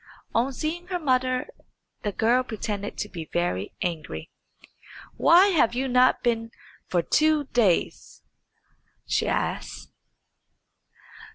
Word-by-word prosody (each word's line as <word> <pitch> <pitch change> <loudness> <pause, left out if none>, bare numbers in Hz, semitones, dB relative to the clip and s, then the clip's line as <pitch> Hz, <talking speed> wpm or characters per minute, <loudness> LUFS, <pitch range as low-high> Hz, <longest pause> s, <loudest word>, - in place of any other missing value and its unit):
On 245 +4 +1
seeing 320 +6 -4
her 365 -1 -2
mother 255 -4 +1 0.6
the 205 - -2
girl 235 +5 +2
pretended 210 -4 -5
to 210 - -3
be 165 -6 -8
very 175 - -2
angry. 165 -3 -5 0.8
"Why 360 +4 +6
have 295 - +2
you 265 +2 -1
not 250 0 +3
been 230 -2 0 0.4
for 175 -2 0
two 310 - +2
days?" 210 -8 0 0.8
she - - 0
asked. - - -3
245 Hz, 110 wpm, -25 LUFS, 205-285 Hz, 0.8 s, Why